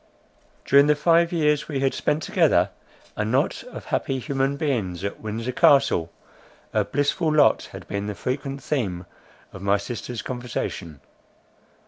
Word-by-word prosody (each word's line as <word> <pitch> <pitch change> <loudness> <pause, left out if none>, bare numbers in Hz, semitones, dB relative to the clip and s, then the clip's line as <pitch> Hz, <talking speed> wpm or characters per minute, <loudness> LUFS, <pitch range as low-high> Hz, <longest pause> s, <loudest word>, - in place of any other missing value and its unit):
During 140 +1 +6
the 150 - +4
five 170 +2 +3
years 150 -3 +1
we 140 -4 -2
had 135 -1 +2
spent 150 +1 -1
together, - - +3 0.4
a - - -1
knot 130 +9 0
of - - -9
happy 135 - -1
human 135 +1 -1
beings 105 - -2
at 100 - -4
Windsor 115 +3 -4
Castle, 120 - +4 0.6
her - - +3
blissful 145 +3 0
lot 150 -1 +3
had - - -10
been 100 0 -3
the 105 - -4
frequent 135 +3 -4
theme 95 -12 -2 0.5
of 95 - -9
my 100 +1 +2
sister's 120 +2 -6
conversation. 120 - -5
130 Hz, 145 wpm, -24 LUFS, 105-145 Hz, 0.6 s, During